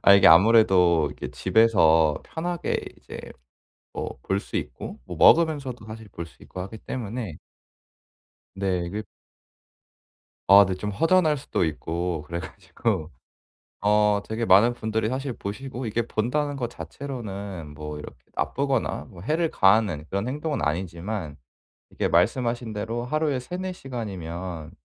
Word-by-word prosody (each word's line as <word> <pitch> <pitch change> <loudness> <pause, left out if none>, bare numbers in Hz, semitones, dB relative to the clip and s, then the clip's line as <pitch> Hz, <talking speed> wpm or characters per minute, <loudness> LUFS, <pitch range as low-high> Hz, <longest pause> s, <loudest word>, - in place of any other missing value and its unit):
아 100 - +8
이게 100 0 +6
아무래도 90 -3 +6
이게 - - -7
집에서 80 -9 +4
편하게 175 +1 -2 0.2
이제 - - -9 0.7
뭐 - - -5
볼 95 +1 0
수 - - -6
있고 - - -5
뭐 - - -7
먹으면서도 145 -9 +4
사실 110 0 -9
볼 85 -3 -7
수 - - -20
있고 90 - -8
하기 110 +4 -8
때문에 110 - -5 1.2
네. 90 -3 -1
그 105 +1 -5 1.4
아 100 +1 +10
네 95 - -2
좀 105 +3 -4
허전할 165 - +3
수도 110 -9 -1
있고 80 +1 -3
그래 85 +1 -3
가지고. 85 +2 -3 0.7
어 105 0 +3
되게 115 +1 -2
많은 105 +6 +6
분들이 110 -1 -1
사실 130 0 -3
보시고 125 +5 -6
이게 115 +2 0
본다는 145 +6 -1
것 120 -3 -2
자체로는 100 - -7
뭐 75 0 -6
이렇게 75 - -9 0.2
나쁘거나 135 -3 -1
뭐 90 -5 -12
해를 160 - 0
가하는 95 -6 +3
그런 100 +4 -2
행동은 150 - -2
아니지만 85 +1 -3 0.5
이게 - - -1
말씀하신 115 +5 +1
대로 115 +3 -3
하루에 150 -1 0
3-4 180 +8 -4
시간이면 90 - -6
105 Hz, 285 characters per minute, -25 LUFS, 90-125 Hz, 1.4 s, 아